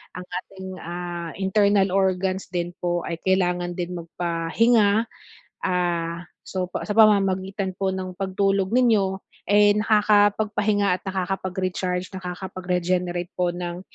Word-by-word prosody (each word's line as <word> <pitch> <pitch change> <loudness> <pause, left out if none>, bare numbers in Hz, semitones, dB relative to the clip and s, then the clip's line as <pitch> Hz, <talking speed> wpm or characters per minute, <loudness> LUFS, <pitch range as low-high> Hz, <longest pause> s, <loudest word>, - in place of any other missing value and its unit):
ang 180 - -6 0.2
ating, 190 -1 -10
ah, 175 0 -5
internal 200 0 +3
organs 190 0 0
din 175 -1 -2
po 175 -1 -1
ay 170 0 -4
kailangan 180 -2 +1
din 180 0 -4
magpahinga. 200 +7 +2 0.6
Ah, 170 -2 0 0.2
so, 185 -1 -3
pa - - -4
sa 210 - -2
pamamagitan 195 -2 +3
po 195 +1 -1
ng 185 -1 -4
pagtulog 195 0 0
ninyo, 220 -6 +3 0.3
eh, 205 0 +6
nakakapagpahinga 210 -1 +3
at - - -39
nakakapag-recharge, 185 -1 -2
nakakapag-regenerate 180 -1 -2
po 180 -1 +1
ng, 175 0 -5
190 Hz, 115 wpm, -24 LUFS, 180-200 Hz, 0.6 s, eh